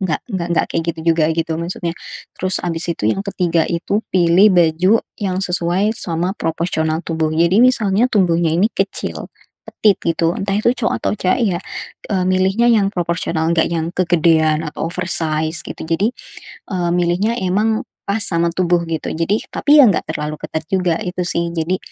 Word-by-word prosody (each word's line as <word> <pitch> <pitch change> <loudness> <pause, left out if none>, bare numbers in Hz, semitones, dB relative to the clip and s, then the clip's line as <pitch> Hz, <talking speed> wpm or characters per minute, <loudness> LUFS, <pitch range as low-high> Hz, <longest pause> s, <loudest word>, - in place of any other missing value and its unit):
Enggak 185 -5 -1
enggak 170 -5 -1
kayak 165 - 0
gitu 165 - -10
juga, 160 -1 +1
gitu, 165 0 -2
maksudnya. 170 0 -4 0.4
Terus, 185 0 +1
habis 165 -1 -3
itu, 110 -10 -1
yang 195 - -1
ketiga 175 -4 0
itu 175 +5 -1
pilih 180 +3 +5
baju 175 +5 +3 0.2
yang 190 -3 -2
sesuai 180 +3 0
sama 175 +2 -2
proporsional 160 -1 -1
tubuh. 160 -1 -1
Jadi, 170 +6 +3
misalnya 225 -3 +3
tubuhnya 170 -5 +2
ini 190 +7 +3
kecil, - - -3 0.4
petite, 210 -3 +1
gitu, 165 +1 0
entah 195 0 -3
itu 215 - +1
cowok 235 - 0
atau - - -1
cewek, 190 +8 0 0.2
ya, - - -3 0.5
e - - +1
milihnya 190 +6 +2
yang 205 -4 +3
proporsional. 170 -2 -1
Enggak 170 -1 +2
yang 165 0 -1
kegedean 160 -3 +2
atau - - -5
oversize, 160 -3 0
gitu. - - -8
Jadi, 200 +9 +1 0.6
eee 175 -3 -1
milihnya 180 +7 0
emang 215 +6 0 0.2
pas 200 +2 0
sama 170 -2 +2
tubuh, 175 -1 +1
gitu, 160 - -3
jadi, 170 +7 0
tapi, 295 +1 +4
ya, - - +8
enggak 190 - 0
terlalu 150 -1 -4
ketat 155 0 -5
juga 180 -3 +1
itu, 180 -1 -3
sih, 170 -1 -1
jadi, 170 +3 -1
175 Hz, 165 wpm, -18 LUFS, 165-195 Hz, 0.6 s, ya